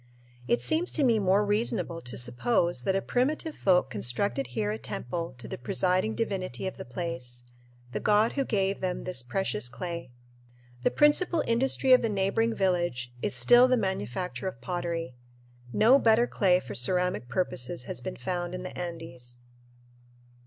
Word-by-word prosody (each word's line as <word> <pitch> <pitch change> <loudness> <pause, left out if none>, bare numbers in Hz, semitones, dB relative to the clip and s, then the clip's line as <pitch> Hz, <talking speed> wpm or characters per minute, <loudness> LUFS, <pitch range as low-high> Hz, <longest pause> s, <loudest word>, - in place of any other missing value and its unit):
It 120 -2 +2
seems 320 - +1
to 300 - +3
me 235 -4 +4
more 200 +1 +3
reasonable 205 -5 -1
to 125 - -5
suppose 130 - 0
that 190 - +2
a 195 - 0
primitive 300 +5 0
folk 180 -8 +2
constructed 120 - -2
here 110 -4 -2
a 110 - -4
temple 150 +7 -4
to 120 - -8
the - - -6
presiding 185 - 0
divinity 190 - -2
of 190 - -4
the - - -7
place, 125 -4 -5 0.5
the - - -2
god 210 +2 +3
who 275 - 0
gave 195 -5 0
them 185 -1 -2
this 180 -7 -2
precious 125 - -2
clay. 170 0 -5 0.7
The - - +3
principal 310 +3 +3
industry 260 +2 +3
of 255 - +7
the 230 - 0
neighboring 210 +3 +1
village 175 -11 0
is - - -1
still 240 - +6
the 255 0 +3
manufacture 190 - -3
of 185 - -5
pottery. 165 +2 -3 0.6
No 235 - +5
better 230 -1 +4
clay 185 -6 +3
for 125 - -8
ceramic 180 - 0
purposes 130 -6 -2
has 125 - -6
been - - -5
found 175 +7 -3
in 180 - -6
the 185 - -7
Andes. 160 -9 -7
180 Hz, 165 wpm, -28 LUFS, -, 0.7 s, of